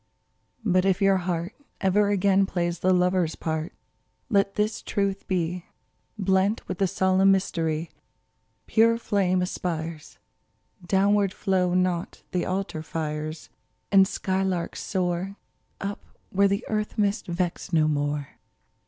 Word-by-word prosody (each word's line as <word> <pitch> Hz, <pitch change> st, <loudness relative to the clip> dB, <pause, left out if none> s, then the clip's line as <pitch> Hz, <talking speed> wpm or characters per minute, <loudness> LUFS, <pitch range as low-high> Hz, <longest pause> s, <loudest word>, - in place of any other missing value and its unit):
But 185 Hz, -2 st, +3 dB
if 190 Hz, -1 st, +2 dB
your 195 Hz, -1 st, +4 dB
heart 175 Hz, +1 st, -2 dB, 0.3 s
Ever 200 Hz, +1 st, +3 dB
again 195 Hz, -1 st, +3 dB
plays 175 Hz, -2 st, -1 dB
the 185 Hz, -, +2 dB
lover's 180 Hz, -2 st, +2 dB
part, 160 Hz, +2 st, -3 dB, 0.6 s
Let 200 Hz, -3 st, +2 dB
this 210 Hz, +1 st, 0 dB
truth 200 Hz, -1 st, -2 dB
be 180 Hz, -1 st, -2 dB, 0.5 s
Blent 195 Hz, +2 st, +1 dB
with 185 Hz, -, -4 dB
the 195 Hz, -, +3 dB
solemn 190 Hz, +1 st, +3 dB
mystery: 165 Hz, -4 st, 0 dB, 0.7 s
Pure 230 Hz, +1 st, +4 dB
flame 190 Hz, -5 st, +1 dB
aspires; 165 Hz, -3 st, -4 dB, 0.7 s
Downward 200 Hz, +2 st, +3 dB
flow 180 Hz, -2 st, +1 dB
not 180 Hz, -2 st, -1 dB
the 180 Hz, -2 st, -1 dB
altar 185 Hz, -4 st, -2 dB
fires; 155 Hz, 0 st, -4 dB, 0.4 s
And 195 Hz, -1 st, +6 dB
skylarks 190 Hz, -3 st, -2 dB
soar 185 Hz, +1 st, -2 dB, 0.4 s
Up 200 Hz, +1 st, -4 dB, 0.3 s
where 200 Hz, +1 st, +4 dB
the 200 Hz, +3 st, -1 dB
earth 215 Hz, -1 st, -2 dB
mists 205 Hz, 0 st, 0 dB
vex 175 Hz, 0 st, -2 dB
no 155 Hz, -3 st, +3 dB
more. 145 Hz, -1 st, -2 dB
185 Hz, 125 wpm, -26 LUFS, 170-195 Hz, 0.7 s, And